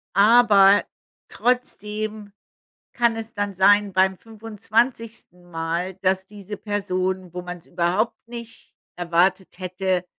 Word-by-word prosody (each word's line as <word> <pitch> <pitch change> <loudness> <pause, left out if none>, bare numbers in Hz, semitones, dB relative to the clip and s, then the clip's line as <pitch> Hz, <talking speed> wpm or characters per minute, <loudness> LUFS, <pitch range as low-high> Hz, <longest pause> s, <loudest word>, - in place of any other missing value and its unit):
Aber 205 -2 +6 0.5
trotzdem 215 -4 -2 0.6
kann 235 -1 +2
es 225 0 -7
dann 205 -1 -3
sein 205 +1 +4
beim 190 0 +2
25 225 -3 -3
Mal, 165 +3 -3
dass 190 0 +1
diese 205 0 -9
Person, 185 -3 -3
wo 180 - -5
man's 180 -1 -9
überhaupt 180 +7 0
nicht 235 -1 -10 0.2
erwartet 180 +2 0
hätte, 185 0 -2
200 Hz, 105 wpm, -23 LUFS, 185-215 Hz, 0.6 s, Aber